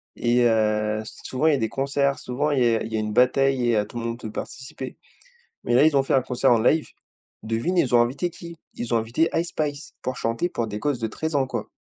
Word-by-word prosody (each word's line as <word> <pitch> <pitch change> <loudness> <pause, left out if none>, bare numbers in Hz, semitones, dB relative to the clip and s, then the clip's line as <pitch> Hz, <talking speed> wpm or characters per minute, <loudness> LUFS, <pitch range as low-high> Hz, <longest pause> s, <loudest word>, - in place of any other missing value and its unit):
et 120 +1 +2
heu, 110 -1 +1 0.2
souvent 130 +5 0
il - - +6
y - - +4
a - - 0
des 110 -3 -1
concerts, 140 +3 0
souvent 140 +5 -1
il 140 - +1
y 115 -1 +3
a - - -1
il - - -7
y 110 - -1
a - - 0
une 105 0 -3
bataille 125 +1 +3
et 115 - +3
heu, 105 - +1
tout - - -9
le 115 - -4
monde 115 +1 -3
peut 110 -3 -7
participer. 130 +1 -7 0.7
Mais 120 - +1
là, 130 - +6
ils 155 -2 +3
ont 135 - +4
fait - - -1
un 135 - +4
concert 125 +1 +1
en 115 - +5
live. 155 +7 +2 0.5
Devine 115 +12 -1
ils 125 -6 +3
ont 120 - +7
invité 135 +9 0
qui? 170 0 -11 0.2
Ils 120 0 -4
ont - - +4
invité 115 +9 +1
Ice 165 +2 0
Spice 145 -1 -4
pour 130 0 -3
chanter 115 +10 -1
pour 115 -7 -2
des 105 0 -5
gosses 145 -2 -1
de 115 - -1
13 160 +7 -4
ans, 135 -2 +2
quoi. - - -4
125 Hz, 265 wpm, -24 LUFS, 115-140 Hz, 0.7 s, ont